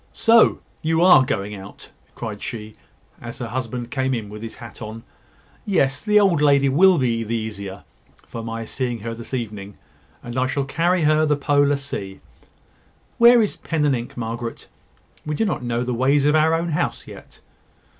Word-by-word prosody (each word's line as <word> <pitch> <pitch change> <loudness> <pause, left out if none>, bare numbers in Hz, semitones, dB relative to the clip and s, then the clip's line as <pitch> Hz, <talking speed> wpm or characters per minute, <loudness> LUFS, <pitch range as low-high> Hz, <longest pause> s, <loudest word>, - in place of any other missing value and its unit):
So, 230 -1 +4 0.2
you 160 +1 +1
are 180 -7 +7
going 105 -4 -3
out?" 100 0 -12 0.2
cried 110 -3 -6
she, 110 -2 -6 0.5
as 120 0 -8
her 120 -2 -5
husband 120 0 -4
came 130 -1 0
in 110 -3 -5
with 105 +1 -9
his 115 0 -7
hat 115 -3 -12
on. 110 +1 -7 0.6
"Yes; 140 -10 +1
the 210 -1 +4
old 185 -7 +3
lady 140 -2 +4
will 180 +6 +5
be 120 -4 0
the 115 +1 -3
easier 100 -3 -6 0.4
for 115 - -7
my 115 0 -5
seeing 120 -1 -3
her 115 +1 -4
this 115 0 -10
evening; 105 -4 -6 0.5
and 120 +1 -4
I 130 - +1
shall 140 +1 -1
carry 170 +5 +1
her 155 +1 +3
the 150 - +3
Polar 145 0 +2
Sea. 115 -9 -6 1.0
Where 235 0 +7
is 210 - -3
pen 160 -3 -1
and 140 -2 +3
ink, 120 0 -7
Margaret? 115 0 -5 0.5
We 150 0 -3
do 225 - 0
not 190 - -2
know 120 0 -2
the 125 0 -2
ways 135 +4 +2
of 150 - +4
our 160 +1 +3
own 170 +1 -2
house 150 - -2
yet." - - -13
130 Hz, 185 wpm, -22 LUFS, 115-150 Hz, 1.0 s, are